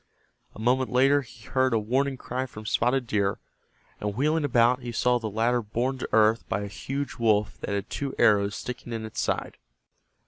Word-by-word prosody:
A - - -11
moment 125 +3 +1
later 135 +3 +4
he 115 -4 -15
heard 130 -2 +1
a - - +3
warning 130 +5 0
cry 130 +1 -4
from 110 -3 -10
Spotted 125 +4 +1
Deer, 100 -3 0 0.6
and 105 -1 -3
wheeling 150 +5 +1
about 125 -2 +3
he 120 -1 -5
saw 125 +1 +2
the 110 -2 -4
latter 115 +4 +1
borne 120 +5 -2
to - - -4
earth 110 +1 +4
by 105 - -1
a 100 - -4
huge 135 +9 -5
wolf 105 -3 +1
that - - -5
had 100 -1 -2
two 140 -2 -4
arrows 100 0 +4
sticking 125 -1 -6
in 110 -1 -4
its 110 - -4
side. - - -2
120 Hz, 195 wpm, -26 LUFS, 110-130 Hz, 0.6 s, later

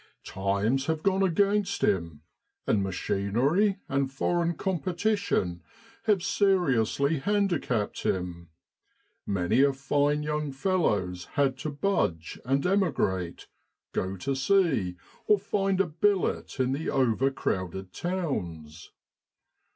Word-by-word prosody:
Times 100 +8 0
have 160 -1 -1
gone 195 -1 +2
against 200 +2 +1
him, 85 -6 0 0.4
and 105 - +2
ma 95 - -1
chinery 125 - +1
and 135 0 0
foreign 170 +5 0
competition 185 - -1 0.4
have 205 -5 +2
seriously 160 - +2
handicapped 175 - 0
him. 85 -2 -3 0.8
Many 100 +5 +2
a 140 0 +4
fine 145 +2 +1
young 150 -1 -2
fellow's 105 - 0
had 140 -2 +3
to 155 - -3
budge, 140 - -1
and 135 +3 0
emigrate, 140 - 0 0.5
go 95 +1 -2
to 135 +9 -2
sea, 135 - +2 0.3
or 210 - +5
find 195 -1 0
a 195 - +4
billet 175 -1 0
in 130 0 +2
the 145 +4 -2
over 130 0 +2
crowded 95 -7 -3
towns. 90 - -4
140 Hz, 110 wpm, -28 LUFS, -, 0.8 s, or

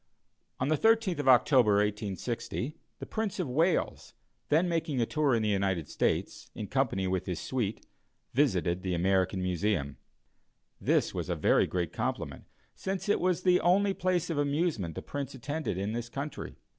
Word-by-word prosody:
On 130 - 0
the 155 - +3
13th 225 -7 +3
of 145 - -2
October, 125 -3 +5
1860, 105 - -2 0.2
the - - -7
Prince 220 -4 -3
of 180 - -1
Wales, 160 +8 0 0.3
then 160 +5 +3
making 165 -5 -1
a 115 - +3
tour 145 -1 +1
in 110 - 0
the 105 - +1
United 95 -6 0
States, - - -1
in 105 - -4
company 115 -5 0
with 95 0 -1
his 90 -3 -2
suite, 115 -5 -3 0.5
visited 90 - +2
the 90 -1 -1
American 95 +1 +1
Museum. 90 -5 -1 0.8
This - - +1
was - - -4
a - - 0
very - - +3
great 90 -3 -2
compliment, - - -3 0.3
since 190 +1 -4
it 205 - +3
was 180 -1 +1
the 180 -1 +5
only 195 +4 +3
place 180 -2 0
of 150 - -1
amusement 145 - 0
the - - -6
Prince 140 -1 -5
attended 145 - -3
in 100 +2 -2
this 120 0 -4
country. 140 +4 -6
125 Hz, 170 wpm, -30 LUFS, 95-160 Hz, 0.8 s, October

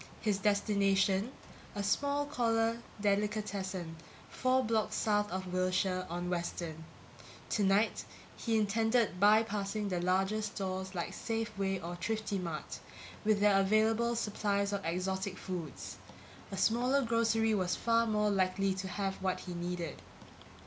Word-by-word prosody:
His 205 -3 0
destination: 200 +1 +2 0.4
a 205 - -2
small 285 +7 +1
corner 230 -4 +1 0.2
delicatessen 200 -4 -1 0.3
four 255 +1 +2
blocks 220 -1 0
south 210 -1 +1
of 185 0 -4
Wilshire, 185 0 +1
on 175 +1 -3
Western. 170 -2 -3 0.7
Tonight 205 +1 +2 0.3
he 225 -2 0
intended 220 -1 +2
bypassing 210 0 +3
the 180 -2 -1
larger 190 +4 +1
stores 190 -2 -4
like 170 - -2
Safeway 215 -4 -2
or 175 +1 -5
Thriftimart, 195 -6 -3 0.4
with 210 -2 +2
their 205 -1 +5
available 220 +4 +3
supplies 205 -2 0
of 200 -1 -2
exotic 190 +3 -2
foods; 170 -7 -6 0.5
a 195 - -4
smaller 250 +7 +3
grocery 225 -1 +2
was 185 -3 +1
far 230 0 +2
more 210 -1 +2
likely 190 0 +1
to 190 0 -4
have 195 +1 -3
what 190 -1 -1
he 180 - -6
needed. 175 -2 -4
200 Hz, 125 wpm, -33 LUFS, 185-220 Hz, 0.7 s, their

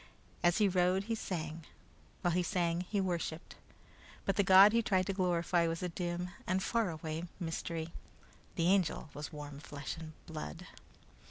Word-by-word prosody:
As 175 0 +4
he 210 - +5
rode 185 +1 +2
he 225 +3 -2
sang, 165 -6 -4 0.6
while 175 - +2
he 180 - +3
sang 175 -2 0
he 205 - +1
worshiped, 175 -3 -2 0.7
but 195 - +1
the 205 - +4
god 195 +2 +8
he 230 - +4
tried 190 -4 +2
to 195 - -1
glorify 175 -2 +2
was 165 +2 -2
a 180 - -1
dim 175 +1 -3 0.2
and 185 +1 +1
faraway 165 -7 -1
mystery. 165 -1 -3 0.6
The 165 - +1
Angel 185 -5 +1
was 150 0 -6
warm 145 -1 -7
flesh 145 0 -6
and 160 -1 -8
blood. 155 - -6
175 Hz, 160 wpm, -34 LUFS, 160-190 Hz, 0.7 s, god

